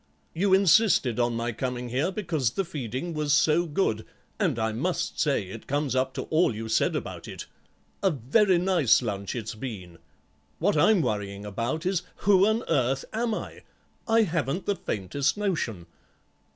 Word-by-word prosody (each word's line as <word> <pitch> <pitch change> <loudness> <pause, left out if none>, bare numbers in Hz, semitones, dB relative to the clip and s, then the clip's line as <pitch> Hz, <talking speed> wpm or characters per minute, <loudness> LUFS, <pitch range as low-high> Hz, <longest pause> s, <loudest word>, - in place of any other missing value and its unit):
You 190 +4 +1
insisted 180 - +4
on 120 -1 +1
my 115 +1 -2
coming 125 +1 -4
here 135 +9 0
because 165 - -1
the 195 - -2
feeding 135 +2 -5
was 150 -2 0
so 160 +4 +3
good, 145 - 0 0.4
and - - +1
I 110 -1 0
must 150 +11 -2
say 140 -8 +1
it 95 +4 -10
comes 140 -2 -1
up 130 0 0
to - - -3
all 155 -7 +1
you 110 +1 -5
said 110 - +2
about - - -5
it. - - -7 0.6
A 195 - +3
very 175 - +2
nice 170 - +3
lunch 100 -2 -3
it's 115 -2 -4
been. 100 -8 -8 0.6
What 200 +2 +1
I'm 175 +4 +4
worrying 100 -3 -3
about 115 - -3
is 185 -1 +1 0.2
who 195 -1 +5
on 220 +2 +1
earth 135 0 +1
am 225 0 0
I? - - -7 0.5
I 225 0 +4
haven't 165 - -2
the 205 - +1
faintest 135 - -2
notion?" 155 - -2
140 Hz, 165 wpm, -26 LUFS, 115-185 Hz, 0.6 s, who